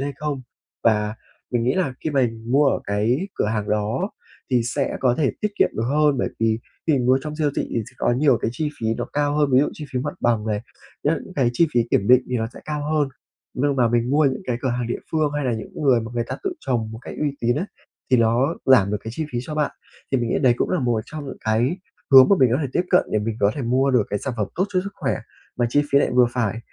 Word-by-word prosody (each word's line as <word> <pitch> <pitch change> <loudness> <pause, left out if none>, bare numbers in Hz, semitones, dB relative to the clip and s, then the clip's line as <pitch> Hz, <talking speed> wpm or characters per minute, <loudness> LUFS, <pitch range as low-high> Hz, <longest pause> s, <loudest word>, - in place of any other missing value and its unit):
hay 140 +1 -2
không 145 -2 -3 0.4
và 105 -1 +2 0.4
mình 120 -2 0
nghĩ 130 - +2
là 160 -9 0
khi 155 - 0
mà 135 -3 +3 0.2
mua 140 +3 +4
ở 135 - +1
cái 105 +6 +1 0.2
cửa - - 0
hàng 105 -1 -2
đó 105 - -1 0.4
thì 125 -2 +3
sẽ 135 +4 -2
có 125 -2 +3
thể 145 - +2
tiết 210 - +1
kiệm - - +5
được 110 - -1
hơn 150 0 +3
bởi - - 0
vì 115 0 +2 0.3
khi 160 - +3
mình 125 -4 +1
mua 130 +1 +5
trong 150 0 -5
siêu 150 -2 +1
thị - - +1
thì - - -3
sẽ - - -25
có - - +2
nhiều 130 -1 +3
cái - - 0
chi 150 +4 -1
phí 110 - -1
nó 120 - -2
cao 145 0 0
hơn, 145 -2 +3
ví 130 - +6
dụ 150 - +2
chi 150 - -8
phí 125 - 0
mặt 145 +3 -4
bằng 115 -2 +1
này, 105 -1 -1 0.4
những 165 +5 -1
cái 125 -4 +3
chi 165 +7 +3
phí 120 - +5
kiểm 100 - +2
định 125 0 +7
thì 125 - +1
nó 115 -1 -1
sẽ - - -10
cao 150 -1 -3
hơn 150 -3 +2 0.5
nhưng 140 +1 0
mà 120 -3 +3
mình 120 +2 +1
mua 150 +1 +3
những 135 -1 0
cái 120 -2 0
cửa 130 - 0
hàng 120 -1 -1
địa 120 - -2
phương 155 -2 +1
hay 145 -2 -1
là 125 - +1
những 110 -1 -5
người 130 -4 +4
mà 115 0 -6
người 120 -1 0
ta - - -4
tự 385 - 0
trồng 115 -4 -1
một 110 - -7
cách - - -8
uy 150 -1 +1
tín 120 +3 +1
á, 180 - -2 0.4
thì 130 - +6
nó 120 +7 +2
giảm 120 -8 +5
được 105 - 0
cái 110 - -4
chi 160 +2 -3
phí 120 - -1
cho 150 +4 -6
bạn. 150 -1 0 0.4
Thì 135 - +3
mình 120 -1 -1
nghĩ - - +1
đấy 125 -3 +5
cũng - - -1
là 180 - +1
một 120 -3 +1
trong 155 -2 -7
những 135 - -7
cái 120 +10 +1 0.3
hướng 130 -1 +10
mà 200 - +6
mình 130 -3 +5
có 130 - +2
thể 135 - -2
tiếp 175 - +2
cận 180 - +5
để 105 - +3
mình 110 +1 -3
có 100 0 +4
thể 140 - -4
mua 130 +3 +2
được 125 -4 +4
cái 105 - 0
sản 130 +2 -4
phẩm 105 -2 0
tốt 185 - +1
cho 185 -3 0
sức 200 - -5
khỏe 135 -6 -1 0.4
mà 120 - +2
chi 145 +4 +3
phí 140 - +7
lại - - +1
vừa 125 -1 +6
phải, 115 -3 -1
130 Hz, 285 wpm, -22 LUFS, 115-145 Hz, 0.5 s, hướng